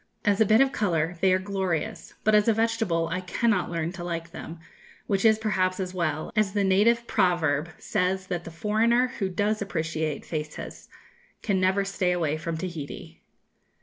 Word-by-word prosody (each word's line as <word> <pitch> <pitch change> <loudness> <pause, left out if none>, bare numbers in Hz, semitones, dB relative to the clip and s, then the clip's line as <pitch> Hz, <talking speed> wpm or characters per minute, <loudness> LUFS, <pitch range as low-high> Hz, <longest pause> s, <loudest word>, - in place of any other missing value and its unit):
As 205 0 +3
a 220 - +5
bit 220 +4 +5
of 270 0 +4
colour 175 - 0
they 190 -1 +4
are 185 - +4
glorious, 190 -4 -3
but 215 - +3
as 210 0 +5
a 225 - +5
vegetable 225 -7 +1
I 185 +2 -2
cannot 195 +2 0
learn 170 -1 -2
to 180 -1 -7
like 165 -1 -4
them, 165 0 -8 0.5
which 195 -2 0
is 220 -1 +6
perhaps 190 -4 0
as 185 -1 -3
well, 155 -4 -2
as 215 -3 +2
the 205 -1 +1
native 215 +5 +3
proverb 170 -6 +1
says 185 -1 -1
that 175 -2 -3
the - - -8
foreigner 225 +8 +2
who 195 -2 0
does 205 +3 0
appreciate 160 -5 -2
faces 150 -2 -6 0.5
can 195 -3 +1
never 190 +2 +2
stay 190 -2 0
away 160 -4 0
from 165 +1 -4
Tahiti. 160 -4 -7
185 Hz, 180 wpm, -26 LUFS, 170-210 Hz, 0.5 s, is